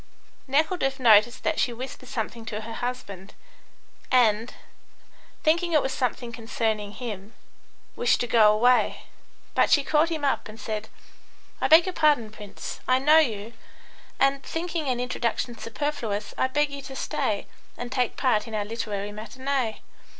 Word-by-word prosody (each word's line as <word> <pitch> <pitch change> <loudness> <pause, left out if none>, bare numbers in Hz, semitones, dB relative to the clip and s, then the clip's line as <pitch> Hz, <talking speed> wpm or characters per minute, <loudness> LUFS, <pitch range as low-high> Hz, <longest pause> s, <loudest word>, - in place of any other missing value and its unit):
Nekhludoff 280 -1 +1
noticed 235 0 +5
that 325 -1 0
she 250 - +2
whispered 255 +1 -8
something 230 0 -4
to 215 -1 -4
her 225 +1 -7
husband, 200 -6 -6 0.8
and, 230 -2 +3 0.9
thinking 340 +2 +2
it 305 - +5
was 265 - -2
something 245 -1 -2
concerning 220 -2 -2
him, 215 -3 -7 0.6
wished 240 -1 +2
to - - +1
go 225 -3 +5
away, 245 +4 +3 0.5
but - - +3
she 290 -3 +5
caught 305 +3 +2
him 315 -3 -2
up 275 - 0
and 215 +1 -11
said: 215 -1 -4 0.7
"I - - +3
beg 325 +2 +7
your 370 - -3
pardon, 295 -10 +3
Prince, 210 -2 -8
I 255 - +4
know 300 +4 +6
you, 225 -6 -1 0.7
and, 275 0 +3
thinking 325 -3 -3
an 250 -1 0
introduction 245 -1 -2
superfluous, 230 -5 -3
I - - +1
beg 295 +2 +1
you 280 0 -6
to 270 0 -9
stay - - -2 0.3
and 245 0 -6
take 250 -2 0
part 235 -6 +1
in 225 - -5
our 205 -1 -1
literary 205 -2 -4
matinee. 235 +3 -3
245 Hz, 155 wpm, -26 LUFS, 220-275 Hz, 0.9 s, beg